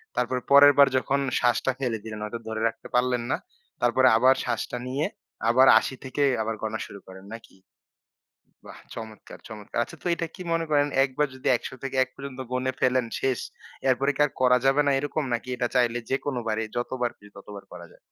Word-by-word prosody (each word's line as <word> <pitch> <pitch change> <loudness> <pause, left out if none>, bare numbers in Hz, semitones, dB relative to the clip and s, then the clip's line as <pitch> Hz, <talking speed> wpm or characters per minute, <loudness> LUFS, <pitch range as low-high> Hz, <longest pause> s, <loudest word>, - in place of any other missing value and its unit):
তারপরে 125 +1 -1
পরের 145 0 +9
বার 140 -1 +8
যখন 140 +2 0 0.2
শ্বাসটা 120 +2 +2
ফেলে 120 -4 -1
দিলেন 110 -1 -7
হয়তো 115 +2 -5
ধরে 110 0 -4
রাখতে 115 0 -7
পারলেন 125 -1 +2
না, - - +3 0.5
তারপরে 130 +2 +4
আবার 130 +3 +5
শ্বাসটা 125 0 -3
নিয়ে 140 +4 -1 0.4
আবার 130 +3 +5
৮০ 130 - -5
থেকে 135 +2 -4 0.2
আবার 110 0 -2
গণা 110 0 -3
শুরু 100 - -11
করেন 95 +1 -12
নাকি? 115 -3 -12 1.1
বাহ! - - -11 0.2
চমৎকার, 110 -1 -9
চমৎকার। 105 -1 -8
আচ্ছা 170 - -11
তো - - -2
এটা 170 - -3
কি 185 - -10
মনে 165 0 0
করেন 145 0 +3 0.2
এক 135 - 0
বার 150 -1 +2
যদি 130 - -6
১০০ - - -7
থেকে 135 0 -4
১ 130 - -11
পর্যন্ত 135 -1 -8
গুনে 130 +1 -1
ফেলেন, 125 -1 +2
শেষ? 130 -3 0 0.5
এরপরে 135 +2 +2
কী - - 0
আর 145 - -5
করা 125 0 +5
যাবে 135 +2 +4
না - - +4
এরকম 145 +1 -2
নাকি 120 +2 -3
এটা 120 0 -1
চাইলে 120 -1 +2
যেকোনো 135 -1 -1
বারই 110 0 -1
যতবার 120 0 -1
খুশি 105 0 -18
ততবার 100 0 -10
করা 85 -1 -10
যায়? - - -20
125 Hz, 200 wpm, -25 LUFS, 115-135 Hz, 1.1 s, পরের